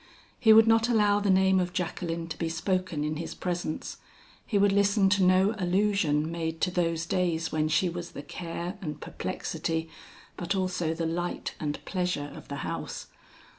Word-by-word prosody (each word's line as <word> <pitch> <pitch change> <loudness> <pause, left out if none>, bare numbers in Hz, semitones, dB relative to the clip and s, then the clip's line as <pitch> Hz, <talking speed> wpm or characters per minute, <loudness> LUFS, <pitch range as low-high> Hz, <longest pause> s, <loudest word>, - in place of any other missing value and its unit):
He 225 -3 +6
would 220 0 +8
not 225 +1 +4
allow 210 -3 +4
the 205 -1 0
name 190 0 +4
of 180 -1 -1
Jacqueline 170 -2 -3
to - - -5
be 165 - -1
spoken 165 -1 -1
in 155 0 -2
his 165 - -5
presence; 175 -3 -3 0.5
he 210 - +1
would 200 0 +4
listen 200 0 +3
to 200 0 +3
no 185 +3 +4
allusion 180 -5 +1
made 165 -1 -3
to 180 - +2
those 165 -2 0
days 170 -2 0
when 155 0 +1
she 170 +4 +2
was 175 0 -5
the 145 - -7
care 175 +4 -6
and 150 -4 -5
perplexity, 160 +2 -3 0.5
but 175 +3 -2
also 180 -4 -1
the 165 0 -2
light 175 +2 -3
and 150 -1 -4
pleasure 180 -6 -2
of - - -11
the - - -5
house. - - -5
175 Hz, 175 wpm, -28 LUFS, 165-195 Hz, 0.5 s, would